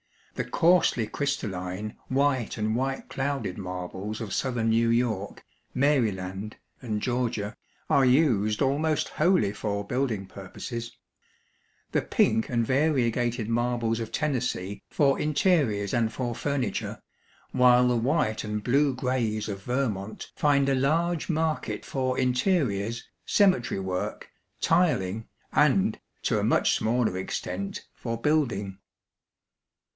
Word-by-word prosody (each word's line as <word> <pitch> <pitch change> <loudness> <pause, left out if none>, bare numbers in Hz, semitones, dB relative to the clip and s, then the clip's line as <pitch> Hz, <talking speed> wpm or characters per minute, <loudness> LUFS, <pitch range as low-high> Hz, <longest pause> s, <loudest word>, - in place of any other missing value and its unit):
The - - -4
coarsely 165 -9 +3
crystalline 105 -6 -3
white 130 -3 +1
and 110 0 0
white 135 +2 -2
clouded 135 -9 -3
marbles 95 +3 -5
of 110 -4 -5
southern 120 -3 0
New 115 +1 +3
York, 115 -4 -1 0.3
Maryland, 105 -8 0 0.3
and 110 -4 -2
Georgia, 120 -4 -1 0.3
are 140 - +4
used 125 -5 +3
almost 150 +3 +1
wholly 180 - +2
for 100 -1 -3
building 120 -4 -1
purposes; 115 +5 -7 0.9
the - - +2
pink 110 - +2
and 120 -2 +1
variegated 120 -4 +1
marbles 120 -1 0
of 115 -1 -5
Tennessee 125 -9 -2
for 140 -2 +2
interiors 140 - +1
and 115 -2 +1
for 120 -2 -3
furniture; 140 -1 -2 0.5
while 125 0 +5
the 125 - +2
white 120 -2 +1
and 105 -1 -3
blue 140 +3 +2
grays 120 -5 -1
of 100 -2 -5
Vermont 110 -4 -3
find 140 -2 +3
a 135 - +3
large 160 +6 +1
market 160 -1 -1
for 130 -1 -1
interiors, 125 - 0 0.2
cemetery 185 - +3
work, 95 -1 -4 0.3
tiling, 115 - +1 0.3
and, - - +3 0.2
to - - +1
a - - -1
much - - +3
smaller 115 -3 +1
extent, 95 +1 -4
for 115 0 -4
building. 115 -10 0
120 Hz, 120 wpm, -27 LUFS, 105-135 Hz, 0.9 s, while